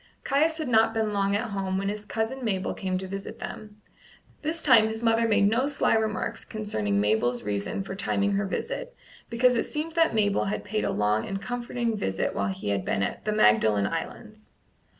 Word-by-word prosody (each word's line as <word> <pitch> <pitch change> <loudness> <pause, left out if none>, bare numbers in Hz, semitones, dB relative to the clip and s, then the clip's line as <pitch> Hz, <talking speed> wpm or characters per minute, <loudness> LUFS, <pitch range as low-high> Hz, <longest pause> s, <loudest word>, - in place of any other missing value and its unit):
Caius 310 +4 +2
had 310 -3 -3
not 225 -2 +3
been 220 -1 0
long 200 0 +1
at 220 +1 -2
home 190 -1 -2
when 195 +1 -2
his 210 +1 -4
cousin 225 +5 -3
Mabel 195 -5 -1
came 185 -1 -2
to 190 0 -5
visit 195 +1 -6
them. 210 -1 -8 0.6
This 320 +2 -3
time 230 -6 +6
his 220 +1 -5
mother 230 0 +3
made 210 -2 +4
no 235 +6 +2
sly 285 - +1
remarks 220 -1 -1
concerning 110 - -2
Mabel's 110 +4 +1
reason 100 - -2
for 195 - -6
timing 200 0 0
her 200 0 0
visit, - - -4 0.3
because 250 +2 +3
it 230 - 0
seemed 305 +2 -3
that 330 -6 +2
Mabel 205 -2 +2
had 195 - -2
paid 215 +1 -2
a - - 0
long 105 +1 +1
and 195 0 -3
comforting 240 +1 -2
visit 95 - -1
while 100 - -1
he 95 +1 -4
had 100 -1 0
been 100 - 0
at - - -4
the 215 - +1
Magdalen 105 - +4
Islands. 105 - -6
210 Hz, 200 wpm, -27 LUFS, 190-230 Hz, 0.6 s, time